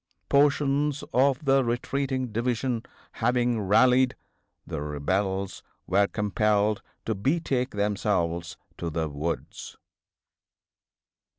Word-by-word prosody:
Portions 145 Hz, 0 st, +2 dB
of 135 Hz, +2 st, +2 dB
the 135 Hz, 0 st, +4 dB
retreating 130 Hz, +2 st, -1 dB
division 120 Hz, +1 st, -1 dB, 0.3 s
having 120 Hz, -1 st, +1 dB
rallied, 125 Hz, +6 st, +4 dB, 0.5 s
the -, -, -4 dB
rebels 95 Hz, +6 st, -2 dB, 0.2 s
were 100 Hz, +2 st, +3 dB
compelled 105 Hz, 0 st, +1 dB, 0.2 s
to 110 Hz, -, 0 dB
betake 130 Hz, -, 0 dB
themselves 95 Hz, -4 st, -1 dB, 0.2 s
to 85 Hz, -, -2 dB
the 80 Hz, 0 st, -2 dB
woods." 75 Hz, +3 st, -5 dB
115 Hz, 90 wpm, -26 LUFS, 95-130 Hz, 0.5 s, the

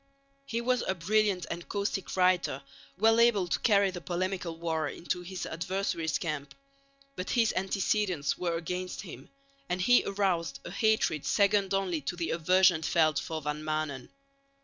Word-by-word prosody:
He 230 Hz, 0 st, -2 dB
was 250 Hz, +1 st, +1 dB
a 190 Hz, -, 0 dB
brilliant 195 Hz, 0 st, +1 dB
and 170 Hz, +1 st, -6 dB
caustic 200 Hz, -2 st, -2 dB
writer, 180 Hz, -7 st, +2 dB, 0.3 s
well 225 Hz, +3 st, +4 dB
able 225 Hz, -6 st, +4 dB
to -, -, 0 dB
carry 200 Hz, -3 st, +3 dB
the 180 Hz, -1 st, -7 dB
polemical 180 Hz, -1 st, -3 dB
war 160 Hz, -2 st, -1 dB
into 180 Hz, +3 st, -4 dB
his 180 Hz, +1 st, -6 dB
adversaries' 170 Hz, -2 st, -2 dB
camp. 150 Hz, -4 st, -4 dB, 0.6 s
But 185 Hz, -, -5 dB
his 230 Hz, -2 st, +2 dB
antecedents 190 Hz, -4 st, 0 dB
were 170 Hz, -2 st, -1 dB
against 180 Hz, +2 st, -4 dB
him, 180 Hz, -, -10 dB, 0.4 s
and 180 Hz, -, -1 dB
he 245 Hz, +7 st, +5 dB
aroused 175 Hz, -8 st, -1 dB
a -, -, -6 dB
hatred 215 Hz, -, +1 dB
second 200 Hz, -1 st, +2 dB
only 185 Hz, -5 st, -1 dB
to 145 Hz, +6 st, -4 dB
the 170 Hz, -2 st, -2 dB
aversion 180 Hz, +1 st, +4 dB
felt 155 Hz, -2 st, +2 dB
for 160 Hz, -2 st, -5 dB
Van 150 Hz, +1 st, -3 dB
Maanen. 155 Hz, -4 st, -3 dB
180 Hz, 155 wpm, -29 LUFS, 165-200 Hz, 0.6 s, he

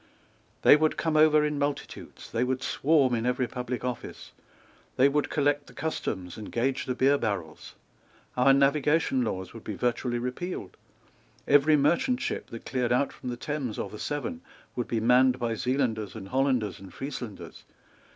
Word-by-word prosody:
They -, -, +9 dB
would 155 Hz, +1 st, +1 dB
come 160 Hz, -1 st, 0 dB
over 155 Hz, -1 st, +5 dB
in 150 Hz, -1 st, -2 dB
multitudes. 145 Hz, 0 st, -5 dB
They 115 Hz, +1 st, +1 dB
would 130 Hz, +1 st, -1 dB
swarm 140 Hz, -4 st, +2 dB
in 115 Hz, 0 st, 0 dB
every 125 Hz, 0 st, +1 dB
public 125 Hz, +1 st, -4 dB
office. 125 Hz, -2 st, -6 dB, 0.6 s
They 130 Hz, -, +5 dB
would 145 Hz, +1 st, 0 dB
collect 145 Hz, 0 st, +1 dB
the -, -, -14 dB
customs, 95 Hz, -, -4 dB
and 110 Hz, -, -8 dB
gauge 130 Hz, +3 st, -1 dB
the 125 Hz, -, -1 dB
beer 140 Hz, +2 st, +3 dB
barrels. 90 Hz, -7 st, -4 dB, 0.6 s
Our 125 Hz, +2 st, +5 dB
Navigation 140 Hz, 0 st, +3 dB
Laws 95 Hz, -5 st, -4 dB
would 115 Hz, -, -10 dB
be 105 Hz, -, -5 dB
virtually 120 Hz, +2 st, -1 dB
repealed. 125 Hz, -, -5 dB, 0.7 s
Every 145 Hz, +2 st, +5 dB
merchant 170 Hz, -, +2 dB
ship -, -, -3 dB
that 115 Hz, -, -9 dB
cleared 125 Hz, -2 st, -1 dB
out 125 Hz, +3 st, +1 dB
from 125 Hz, -, -7 dB
the 120 Hz, -, -4 dB
Thames 140 Hz, -5 st, -4 dB
or -, -, -4 dB
the 105 Hz, -, -9 dB
Severn 145 Hz, -, -4 dB, 0.3 s
would 120 Hz, -, -2 dB
be 115 Hz, -, -1 dB
manned 125 Hz, +3 st, +4 dB
by 120 Hz, -2 st, -1 dB
Zealanders 115 Hz, -3 st, -1 dB
and 95 Hz, -3 st, -8 dB
Hollanders 130 Hz, -5 st, 0 dB
and 95 Hz, -2 st, -12 dB
Frieslanders. 125 Hz, -, -7 dB
130 Hz, 170 wpm, -27 LUFS, 115-145 Hz, 0.7 s, They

